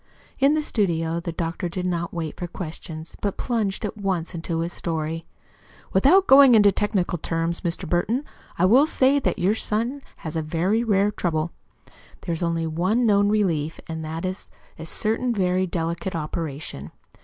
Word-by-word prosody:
In 280 +2 +4
the 310 - 0
studio 170 - 0
the 170 0 -4
doctor 170 +2 -3
did 180 +1 -4
not 175 -1 -1
wait 165 -3 -4
for 175 - -3
questions, 160 -2 -7
but 200 -2 -2
plunged 220 -4 -1
at 210 - -5
once 190 -5 -2
into 165 -1 -3
his 170 +1 -3
story. 160 0 -3 0.7
"Without 300 - +5
going 270 -4 +8
into 205 -2 +6
technical 195 -4 0
terms, 165 +2 -2
Mr. 175 +1 -3
Burton, 220 - 0 0.3
I 175 - +3
will 255 +10 +6
say 275 -2 +3
that - - -1
your 190 +2 +2
son 230 +5 -1
has 155 0 -7
a 160 - 0
very 175 +9 0
rare 205 -2 +2
trouble. 165 -4 -1 0.7
There 170 - -3
is 165 - -3
only 165 -1 0
one 185 +10 +1
known 205 -2 +4
relief, 170 -8 0
and 160 -1 -5
that 160 +3 -4
is 185 +1 -5 0.3
a 160 - -6
certain 230 +6 0
very 185 -1 +1
delicate 170 +2 -3
operation. 150 - -4
180 Hz, 170 wpm, -24 LUFS, 165-210 Hz, 0.7 s, going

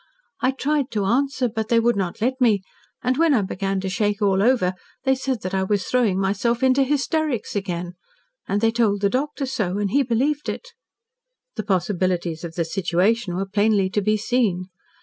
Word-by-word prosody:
I 255 - +3
tried 280 +1 0
to 205 -3 0
answer, 260 +3 +1
but 220 -1 -4
they 235 - +4
would 235 +1 +2
not 190 -1 -3
let 260 +3 0
me, 210 -6 +3 0.4
and 250 +1 +1
when 325 -2 +4
I 215 - +2
began 195 +1 -2
to 190 - -3
shake 205 +1 0
all 195 -2 +2
over, 215 -6 +3 0.3
they 265 - +3
said 260 -3 -2
that 185 - -4
I 190 - +1
was 195 0 0
throwing 225 -7 +1
myself 205 +6 0
into 260 +1 +4
hysterics 290 -3 0
again. 180 -3 -3 0.5
And 205 +1 0
they 225 0 +3
told 220 -4 +1
the 200 -1 +2
doctor 280 +2 -1
so, 210 -8 -2
and 205 -2 -1
he 280 - +4
believed 275 +4 0
it." - - -5 0.9
The - - -2
possibilities 180 -3 -1
of 165 -1 -6
the 170 - 0
situation 185 +3 0
were 195 +2 -1
plainly 205 -1 +2
to 210 - +1
be 215 +2 +2
seen. 205 -5 0
215 Hz, 190 wpm, -22 LUFS, 190-255 Hz, 0.9 s, they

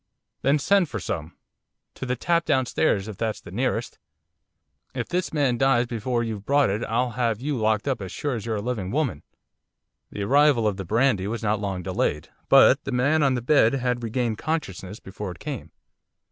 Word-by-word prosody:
'Then 140 +2 +3
send 185 +3 +2
for 110 - -4
some, 80 -2 -5 0.6
to 130 - -6
the 125 - 0
tap 170 +6 +1
downstairs, 130 -7 +1
if 105 -3 -7
that's 110 0 -2
the - - -12
nearest! 120 +2 -2 1.0
If - - -3
this 180 0 -2
man 135 -6 +1
dies 135 -3 +3
before 120 +1 -2
you've 110 -3 -4
brought 140 -1 +3
it 105 +4 -2
I'll 120 +2 0
have 115 -3 -1
you 145 +3 -2
locked 110 0 0
up 135 -6 -1
as 95 -2 -6
sure 145 +5 -2
as 115 -4 -4
you're 115 -1 -2
a 100 - -3
living 110 -6 -3
woman.' 130 - -1 0.9
The 100 - -5
arrival 140 0 +4
of 100 -2 -1
the 95 - -5
brandy 110 -1 +2
was 115 +2 -4
not 105 0 +1
long 95 -3 -3
delayed, 85 -4 -1 0.2
but - - +6
the 140 - -4
man 140 +5 +2
on 135 -3 +3
the 120 - -3
bed 125 -3 +4
had 125 -2 -1
regained 115 -1 -2
consciousness 105 - -4
before 100 +1 -7
it 90 - -8
came. 140 -6 -6
120 Hz, 195 wpm, -24 LUFS, 105-135 Hz, 1.0 s, but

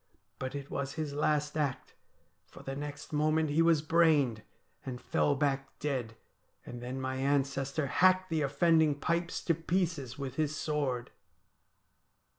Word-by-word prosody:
But 130 +2 -4
it 140 -1 -6
was 140 0 -3
his 155 -3 -3
last 150 0 0
act, 145 -4 -2 0.5
for - - -13
the 135 - -4
next 145 +2 -7
moment 155 0 +2
he 155 +3 +3
was 165 -2 +4
brained, 155 -8 +3 0.4
and 125 -2 -5
fell 145 - +1
back 135 -1 -1
dead, 130 -6 -3 0.5
and 120 0 -8
then 125 +2 -4
my 130 0 -2
ancestor 140 +1 0
hacked 185 +5 +3
the 160 -1 +1
offending 155 +1 +3
pipes 170 +3 -1
to 165 - +2
pieces 165 -6 -1
with 135 -2 -5
his 155 -1 0
sword. 140 -4 -2
145 Hz, 145 wpm, -31 LUFS, 135-155 Hz, 0.5 s, was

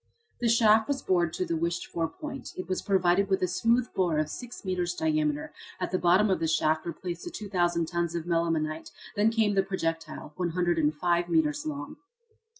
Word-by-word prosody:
The 240 - +1
shaft 220 -1 +5
was 280 -2 -2
bored 175 -3 +2
to 185 - -1
the 165 -1 -1
wished 170 +2 -1
for 165 -1 -2
point. 285 - -8
It 185 - -5
was 185 -1 -1
provided 190 0 +2
with 190 -1 +1
a - - +3
smooth 230 +6 +2
bore 175 -5 +1
of 155 0 0
six 245 -4 -8
metres 180 -2 -1
diameter. 155 -2 0 0.3
At 180 - -2
the 185 - +1
bottom 185 +4 +4
of 190 - +1
the 165 - 0
shaft 155 0 +1
were - - -1
placed 175 +1 -6
the - - -5
2,000 175 -5 0
tons 170 0 -2
of 170 -1 -3
melimelonite; 165 -2 -1 0.3
then 210 +2 +4
came 220 -2 +2
the 195 - +4
projectile 165 -5 -4
105 175 -1 +1
metres 155 -3 +1
long. 145 -1 -5
175 Hz, 190 wpm, -28 LUFS, 165-195 Hz, 0.3 s, shaft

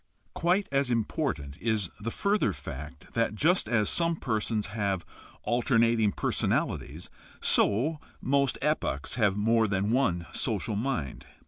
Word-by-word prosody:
Quite 180 +4 +1
as 140 -2 +1
important 115 - -2
is 110 -6 0
the 110 +2 -3
further 200 - +1
fact 75 +3 -9
that 115 -2 0
just 170 - +2
as 110 -4 +2
some 170 -1 +2
persons 110 -5 -1
have 100 -5 -1 0.4
alternating 115 -3 +2
personalities, 80 -2 -1 0.3
so 135 +10 +2 0.2
most 140 -1 +1
epochs 70 +1 0
have 105 -4 +2
more 115 +1 +3
than 100 +1 0
one 95 -10 +1
social 105 - -1
mind. 105 - -3
110 Hz, 125 wpm, -28 LUFS, 100-135 Hz, 0.4 s, more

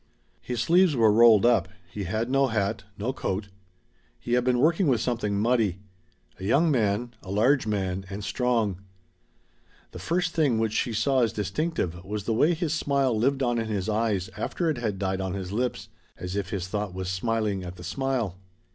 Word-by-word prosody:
His 125 -2 -4
sleeves 175 +4 +4
were 115 -3 +5
rolled 115 -1 +6
up; 115 -7 +4 0.2
he 100 0 -5
had 110 +6 -1
no 135 +1 +2
hat, 105 -4 -1
no 115 +6 -2
coat. 100 -4 -3 0.7
He 120 - -3
had 125 0 +3
been 125 0 +2
working 165 +6 +3
with 125 -5 +3
something 110 -5 -1
muddy. 110 -4 +1 0.6
A - - -8
young 145 - +3
man, 115 -1 0
a 95 - -12
large 115 +6 +2
man, 95 -2 -2
and 100 +1 -6
strong. 115 -6 0 1.1
The - - -9
first 175 0 -1
thing 145 -8 +2
which 110 -1 0
she 120 - 0
saw 130 +4 +2
as 115 - +2
distinctive 105 - -2
was 105 +2 -4
the 115 - -1
way 155 +10 +3
his 160 -2 -1
smile 140 -5 +1
lived 135 +5 +1
on 120 -1 +1
in 115 - -2
his 100 -3 -2
eyes 105 -4 0
after 160 - -1
it 135 - -4
had 110 -5 -2
died 95 -1 -1
on 95 0 -3
his 95 -1 -5
lips, 125 +4 -2 0.3
as 90 +1 -5
if 100 -2 -2
his 95 -3 -3
thought 105 -1 -3
was 95 -1 -4
smiling 105 +1 -1
at 90 0 -7
the 90 - -11
smile. 115 -1 -2
110 Hz, 190 wpm, -26 LUFS, 100-130 Hz, 1.1 s, rolled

